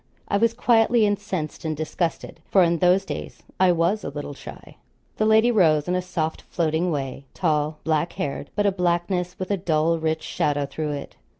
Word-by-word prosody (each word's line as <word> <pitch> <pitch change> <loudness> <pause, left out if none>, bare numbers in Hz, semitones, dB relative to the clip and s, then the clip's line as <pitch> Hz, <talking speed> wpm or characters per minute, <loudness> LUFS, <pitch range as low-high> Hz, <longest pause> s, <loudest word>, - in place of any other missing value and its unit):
I 200 - +1
was 230 +2 +2
quietly 230 -1 +4
incensed 200 -6 -3
and 155 -2 -2
disgusted; 165 +1 -3
for 190 - +5
in 170 -1 +2
those 180 +3 +3
days - - -7 0.2
I 185 -1 +5
was 175 +5 +1
a - - -3
little 145 0 -6
shy. - - -12 0.4
The 215 - +2
lady 220 +2 +5
rose, 160 -8 +3
in 180 - 0
a 180 - +1
soft 170 -3 -3
floating 165 +1 -1
way; 135 -3 -4
tall, 155 -3 0
black 160 +1 0
haired 140 0 -4
but 205 0 +1
a 200 - +4
blackness 180 0 -1
with 185 +1 -4
a 200 - +2
dull 165 -2 +1
rich 160 0 -1
shadow 145 -1 0
through 150 +2 -4
it. 140 -1 -7
170 Hz, 190 wpm, -24 LUFS, 155-195 Hz, 0.4 s, for